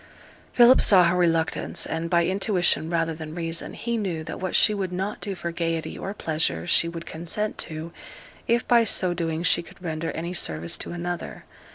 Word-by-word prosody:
Philip 245 Hz, +1 st, +7 dB
saw 185 Hz, -3 st, +7 dB
her 170 Hz, +1 st, +3 dB
reluctance, 165 Hz, -2 st, +1 dB
and, 160 Hz, +1 st, -3 dB
by 170 Hz, -1 st, +3 dB
intuition 185 Hz, -3 st, +1 dB
rather 165 Hz, -1 st, 0 dB
than 155 Hz, 0 st, -8 dB
reason, 165 Hz, -1 st, -4 dB
he 235 Hz, 0 st, -2 dB
knew 180 Hz, -7 st, -3 dB
that -, -, -7 dB
what 185 Hz, -1 st, -3 dB
she 215 Hz, -, +5 dB
would 195 Hz, -3 st, -3 dB
not 190 Hz, +3 st, -3 dB
do 200 Hz, -2 st, -4 dB
for 170 Hz, -1 st, -4 dB
gaiety 165 Hz, -1 st, -2 dB
or 195 Hz, -, -5 dB
pleasure 155 Hz, -, -1 dB
she 170 Hz, -, +2 dB
would 170 Hz, 0 st, -7 dB
consent 175 Hz, +6 st, -3 dB
to, 160 Hz, +1 st, -5 dB, 0.6 s
if 235 Hz, +1 st, +1 dB
by 240 Hz, -1 st, +5 dB
so 185 Hz, -4 st, +2 dB
doing 165 Hz, -1 st, -2 dB
she 175 Hz, -1 st, +3 dB
could 170 Hz, -, -16 dB
render 165 Hz, -2 st, -4 dB
any 170 Hz, +2 st, -4 dB
service 85 Hz, -, +1 dB
to -, -, -4 dB
another. 175 Hz, 0 st, -5 dB
170 Hz, 190 wpm, -25 LUFS, 165-185 Hz, 0.6 s, Philip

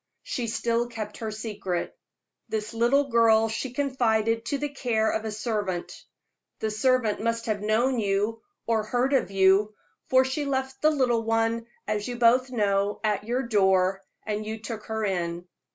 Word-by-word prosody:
She 240 Hz, -2 st, -3 dB
still 235 Hz, +1 st, 0 dB
kept 220 Hz, -3 st, -6 dB
her 220 Hz, -, -4 dB
secret. 210 Hz, -5 st, -4 dB, 0.5 s
This 215 Hz, +1 st, -3 dB
little 260 Hz, +4 st, +2 dB
child 225 Hz, -1 st, +4 dB
she 225 Hz, +4 st, -3 dB
confided 230 Hz, -4 st, +1 dB
to 280 Hz, -, -1 dB
the 295 Hz, +1 st, -3 dB
care 230 Hz, -6 st, 0 dB
of 220 Hz, -, -2 dB
a 220 Hz, -, -2 dB
servant. 210 Hz, -5 st, -3 dB, 0.5 s
The 220 Hz, -, -2 dB
servant 225 Hz, -1 st, +1 dB
must 230 Hz, 0 st, -1 dB
have 215 Hz, -3 st, -1 dB
known 235 Hz, +4 st, +1 dB
you 205 Hz, +2 st, 0 dB, 0.2 s
or 225 Hz, -1 st, +1 dB
heard 245 Hz, +5 st, 0 dB
of 265 Hz, -, +2 dB
you, 195 Hz, +2 st, +3 dB, 0.3 s
for 260 Hz, 0 st, +4 dB
she 265 Hz, +3 st, -2 dB
left 265 Hz, -1 st, -2 dB
the 310 Hz, -, +5 dB
little 255 Hz, -6 st, +2 dB
one, 225 Hz, +1 st, 0 dB, 0.2 s
as 210 Hz, -1 st, -1 dB
you 245 Hz, -, -4 dB
both 245 Hz, +2 st, +4 dB
know, 205 Hz, -4 st, 0 dB
at 210 Hz, -1 st, 0 dB
your 245 Hz, +3 st, -1 dB
door, 190 Hz, -4 st, +2 dB, 0.2 s
and 215 Hz, 0 st, -2 dB
you 220 Hz, +1 st, -5 dB
took 220 Hz, -1 st, -7 dB
her 220 Hz, -1 st, -2 dB
in. 175 Hz, -2 st, -2 dB
225 Hz, 170 wpm, -26 LUFS, 210-245 Hz, 0.5 s, the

